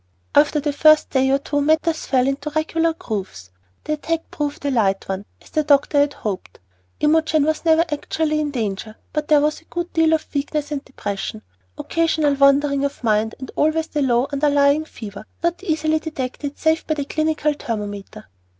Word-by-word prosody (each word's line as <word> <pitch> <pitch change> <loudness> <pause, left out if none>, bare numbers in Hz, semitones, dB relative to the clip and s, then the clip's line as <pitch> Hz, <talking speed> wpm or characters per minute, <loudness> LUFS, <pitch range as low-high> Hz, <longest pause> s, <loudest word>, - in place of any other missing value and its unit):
After 300 +1 +4
the 295 0 -1
first 310 +1 +5
day 265 0 +2
or 270 - +4
two 290 +1 -2
matters 315 +2 +1
fell 255 -1 +2
into 275 +2 -2
regular 325 +1 +1
grooves. 190 - -6 0.3
The 305 - -2
attack 320 +2 -3
proved 290 -1 -4
a 285 - +1
light 200 -6 +1
one, 195 +1 -4
as - - -20
the 310 - +2
doctor 285 0 +3
had 285 0 +2
hoped. 190 - -5 0.4
Imogen 310 0 +3
was 310 +1 0
never 325 0 +5
actually 305 0 -1
in 300 -1 -1
danger, 215 -4 -3 0.2
but 300 -1 -2
there 300 -2 +5
was 300 +1 0
a - - -28
good 345 +1 -5
deal 325 -1 +3
of 315 - 0
weakness 295 +1 -2
and 285 -1 -3
depression, 210 -3 -5 0.3
occasional 320 -3 +1
wandering 280 0 +3
of 280 -2 -3
mind, 220 0 +1
and 260 - -8
always 315 +1 +2
the 300 - -1
low, 245 -2 +2
underlying 285 +1 +3
fever, 210 -9 -9 0.2
not 340 +2 0
easily 315 -3 +1
detected 285 -2 -5
save 320 0 +1
by 310 - +1
the 285 -2 -3
clinical 310 0 0
thermometer. 210 -4 -6
290 Hz, 180 wpm, -21 LUFS, 260-310 Hz, 0.4 s, first